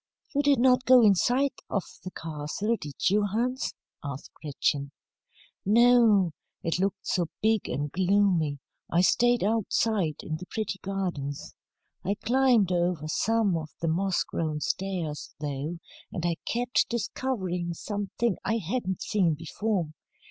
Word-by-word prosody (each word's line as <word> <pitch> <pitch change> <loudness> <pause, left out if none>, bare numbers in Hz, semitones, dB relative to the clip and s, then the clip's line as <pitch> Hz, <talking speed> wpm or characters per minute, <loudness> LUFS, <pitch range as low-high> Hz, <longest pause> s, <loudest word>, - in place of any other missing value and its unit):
"You 285 - +3
did 285 -1 +4
not 250 +1 +4
go 255 -1 +7
inside 245 +7 +3 0.2
of 200 - 0 0.2
the 185 - -5
castle, 160 +7 -3
did 145 -9 -3
you, 210 +1 +3
Hans?" 235 +6 -1 0.3
asked 140 -1 -7
Gretchen. 140 -1 -2 0.7
"No. 225 -4 +5 0.3
It 165 +1 0
looked 195 +1 -1
so 175 -3 0
big 220 -1 +1
and 145 0 -2
gloomy, 185 -5 +2 0.3
I 170 - +3
stayed 240 +4 +3
outside 210 -5 +1
in 155 - -3
the 180 +3 -10
pretty 210 -3 -3
gardens. 180 -8 -4 0.5
I 200 +3 0
climbed 235 -3 +3
over 175 -3 0
some 215 +3 +1
of 160 -1 -4
the 165 - 0
moss 185 +3 +1
grown 155 -2 -3
stairs, 175 -4 -3
though, 150 +3 -3 0.3
and 175 - -3
I 170 -1 0
kept 245 +1 +1
discovering 190 -7 -2
something 205 +3 -2
I 225 - +1
hadn't 190 -1 -2
seen 180 -7 +2
before. 170 +2 -2
190 Hz, 135 wpm, -27 LUFS, 165-225 Hz, 0.7 s, go